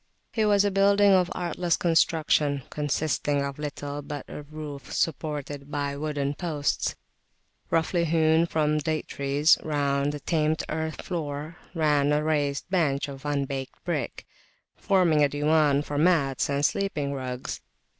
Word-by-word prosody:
It 220 -2 +2
was 205 -1 +4
a 205 - +2
building 200 +1 +4
of 185 -2 +4
artless 175 -1 0
construction, 155 -4 +2
consisting 145 -1 0
of 140 +1 -5
little 145 -1 -5
but 145 -1 -6
a - - -7
roof 150 -1 -8
supported 145 -3 -2
by 145 -1 -2
wooden 145 -1 -2
posts, 150 -3 -1 0.7
roughly 170 +1 +1
hewn 160 0 +3
from 150 -2 +1
date 155 0 -2
trees: 140 +3 +3
round 140 -2 0
the 150 - -6
tamped 155 +1 0
earthen 160 0 -3
floor 155 -1 -4 0.2
ran 150 -3 +2
a 150 +1 +1
raised 145 -2 0
bench 150 -6 +1
of 135 0 -9
unbaked 140 -2 -2
brick, 150 -8 -3 0.5
forming 170 -6 +3
a 145 - +4
diwan 145 0 +2
for 145 -1 -3
mats 150 -7 +2
and 140 +1 +1
sleeping 150 -8 -1
rugs. 130 -2 -5
150 Hz, 140 wpm, -26 LUFS, 140-160 Hz, 0.7 s, was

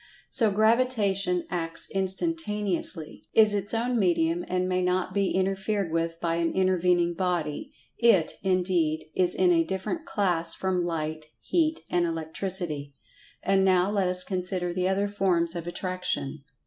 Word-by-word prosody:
So 225 -4 +3
Gravitation 205 -4 +1
acts 165 -1 -2
instantaneously; 195 - -1
is 215 -2 +6
its 205 0 -1
own 235 +1 0
medium, 170 -2 +1
and 185 0 -1
may 185 0 0
not 180 0 0
be 200 -1 +1
interfered 195 0 -1
with 165 0 -1
by 165 -1 -1
an 170 -1 0
intervening 180 -2 +2
body. 170 -4 -2 0.3
It, 215 -9 +4
indeed, 180 -4 +1
is 180 -1 +3
in 185 -1 +3
a 165 -1 +4
different 190 - -4
"class" 170 -5 +1
from 185 -2 -1
Light, 155 -2 -3
Heat 320 -2 0
and 175 -1 +2
Electricity. 160 -3 -3 0.5
And 195 0 +3
now 185 0 +3
let 200 -3 +1
us 180 0 +2
consider 180 -2 -2
the 185 +1 0
other 200 +1 +1
forms 185 -4 0
of 170 -1 -5
Attraction. 175 -6 -3
185 Hz, 145 wpm, -27 LUFS, 170-195 Hz, 0.5 s, is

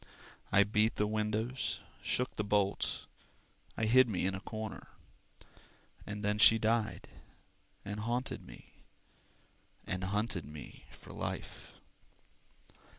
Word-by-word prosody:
I 100 - +7
beat 105 +2 +2
the 105 - +2
windows, 110 +4 -1 0.2
shook 125 +1 -1
the 105 - -1
bolts. 100 -1 +1 0.7
I 110 - +1
hid 125 +2 +6
me 95 -4 0
in 95 - +1
a 95 - -3
corner 110 +1 -6 1.2
And 105 0 -5
then 105 0 +1
she 110 +1 +8
died 110 0 0 0.8
and 105 +1 -4
haunted 120 +4 -1
me, - - -14 1.1
And 90 +1 -2
hunted 105 -2 0
me 75 +1 -10
for - - -12
life. - - -5
105 Hz, 115 wpm, -33 LUFS, 100-110 Hz, 1.2 s, she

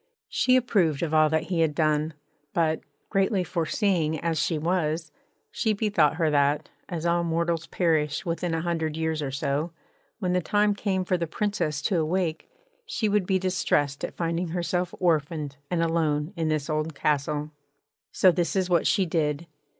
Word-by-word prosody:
She 255 - +3
approved 190 - +2
of 160 -2 -2
all 155 -1 +5
that 160 +1 +1
he 170 0 -2
had 160 -2 +2
done; 155 0 +1 0.4
but, 160 -2 +2 0.3
greatly 195 -1 +2
foreseeing 170 - 0
as 165 -2 0
she 165 0 0
was, 160 0 -1 0.4
she 220 -2 0
bethought 205 -8 +2
her 160 -2 +1
that, 145 +1 +2 0.2
as 170 -2 -4
all 170 0 +2
mortals 170 0 -1
perish 155 -3 0
within 170 0 -1
a 165 - -1
hundred 160 -3 -1
years 160 -1 -1
or 140 - -2
so, 140 +4 -2 0.4
when 180 -4 -1
the 180 - +2
time 205 +3 +2
came 190 -2 -1
for 180 - +1
the 170 -1 -2
Princess 160 -6 -1
to 185 - +1
awake 160 0 -1 0.3
she 345 - -1
would 205 -3 +1
be 190 - +3
distressed 175 -6 0
at - - -5
finding 170 +1 -1
herself 175 +1 -1
orphaned 155 -4 0
and 170 -2 +1
alone 160 0 0
in 165 -2 -1
this 155 -2 -1
old 155 -1 -2
castle. 150 +1 0 0.6
So 185 - +5
this 175 0 -1
is 185 -1 0
what 170 -2 +3
she 195 -3 +3
did. 155 -2 -1
165 Hz, 175 wpm, -26 LUFS, 155-180 Hz, 0.6 s, all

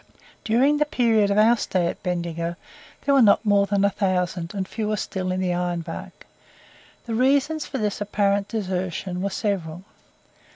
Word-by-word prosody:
During 260 +6 +3
the 300 - +2
period 230 -7 +2
of 200 - +1
our 220 +3 +6
stay 185 -5 -1
at 170 - -3
Bendigo 170 -1 -3 0.5
there 280 - +3
were 275 - +6
not 215 0 +5
more 200 -1 +3
than 200 0 +2
a 200 - +2
thousand, 180 -4 -1
and 190 -2 -2
fewer 215 -1 -2
still 185 -1 -3
in 185 - -1
the 180 -1 0
Iron 175 -1 -1
Bark. 165 0 -9 0.8
The 230 - -4
reasons 280 +6 +1
for 270 - -4
this 210 -3 -2
apparent 200 -1 +1
desertion 185 -3 -3
were 200 - -1
several. 185 -4 -3
200 Hz, 170 wpm, -23 LUFS, 180-220 Hz, 0.8 s, our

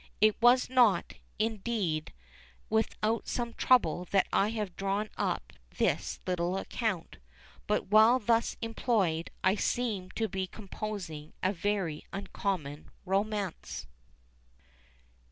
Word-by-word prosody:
It 215 0 +5
was 245 +2 +6
not, 240 -8 +3 0.2
indeed, 215 -7 -1 0.6
without 220 0 0
some 235 -1 -2
trouble 180 -8 +3
that 195 +2 +2
I 200 - +3
have 210 -5 -3
drawn 200 +2 -1
up - - -2 0.2
this - - 0
little 180 0 0
account; 195 -4 -3 0.5
but - - 0
while 220 +4 +7
thus 230 0 +1
employed, 210 -8 0
I 185 - +5
seemed 210 -4 -1
to 225 - 0
be 190 -1 -3
composing 190 -6 -6
a 185 +2 +2
very 190 -5 -1
uncommon 185 -7 -3 0.2
romance. 195 - -2
200 Hz, 110 wpm, -30 LUFS, 185-225 Hz, 0.6 s, while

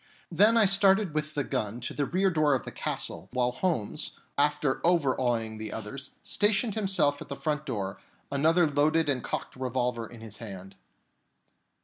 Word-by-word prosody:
Then 225 +3 +5
I 220 - +6
started 195 -2 +4
with 155 0 -3
the 145 - +1
gun 120 -4 -3
to - - -4
the 145 -2 -1
rear 190 +2 +2
door 155 -4 +3
of 130 - -3
the - - -6
castle, - - -4
while 125 -1 +2
Holmes, 150 - -2 0.2
after 145 -1 +1
overawing 125 -9 +1
the 110 -1 -5
others, 115 +6 -6
stationed 210 +1 +2
himself 190 -9 +1
at - - -8
the 140 - -4
front 150 +1 -2
door, 100 -6 -3 0.3
with 140 - -1
another 165 +4 +4
loaded 150 +2 +2
and 130 -3 0
cocked - - -4
revolver 125 -2 -2
in 115 0 -12
his 110 -2 -8
hand. 95 -3 -9
145 Hz, 170 wpm, -28 LUFS, 120-165 Hz, 0.3 s, I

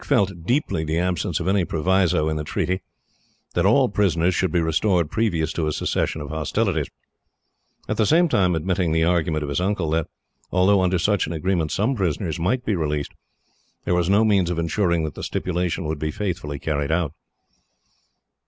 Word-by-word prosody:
Dick - - -14
felt 95 -4 +1
deeply 125 - 0
the 80 +1 -1
absence 90 -1 -1
of 85 - -3
any 95 -1 +2
proviso, 85 -1 +1
in 80 - -1
the 75 - -2
treaty, 90 +4 -2 0.7
that 85 +2 +2
all 130 +5 +4
prisoners 90 -5 +1
should 95 0 0
be 85 - +2
restored 85 0 +1
previous 85 -8 0
to 80 -2 -1
a - - 0
cessation 80 - -1
of 75 - -7
hostilities; 80 -2 -1 1.0
at - - -2
the 110 - +3
same 170 +3 +4
time 90 - +2
admitting 90 0 0
the 80 0 +2
argument 80 -2 +1
of 70 - -4
his 70 +5 -1
uncle 95 -4 -1
that, 80 -1 0 0.4
although 95 +2 +4
under 90 0 +2
such 100 +1 +1
an 80 - -4
agreement 85 -1 -1
some 110 +7 +1
prisoners 90 - -2
might 120 +9 0
be 105 - +1
released, 75 -3 -2 0.7
there - - +1
was 90 0 +1
no 105 +3 +4
means 100 -5 +3
of 90 - -2
insuring 85 0 +1
that 75 -3 -3
the - - -8
stipulation 90 -1 -2
would 75 -1 -3
be 80 - -2
faithfully 85 -5 -3
carried 75 0 -2
out. 80 -3 0
85 Hz, 190 wpm, -23 LUFS, 80-95 Hz, 1.0 s, all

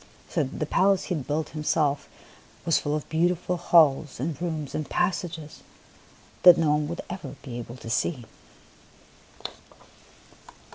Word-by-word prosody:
So 160 - +1
the 135 +3 -4
palace 190 +4 +3
he 180 - -2
had 140 -5 -5
built 150 +1 -1
himself 150 -2 0 0.6
was 165 - +3
full 145 0 -1
of 155 - -4
beautiful 175 +2 +1
halls 155 -5 +4
and 145 +2 -3
rooms 155 -5 -3
and 155 - -3
passages 175 -4 -2 0.8
that 180 -1 +9
no 160 -3 +3
one 150 0 +1
would 170 +2 -4
ever 160 -7 -7
be 120 -4 -6
able 120 0 -8
to 115 - -11
see. 125 0 0
155 Hz, 140 wpm, -26 LUFS, 145-170 Hz, 0.8 s, that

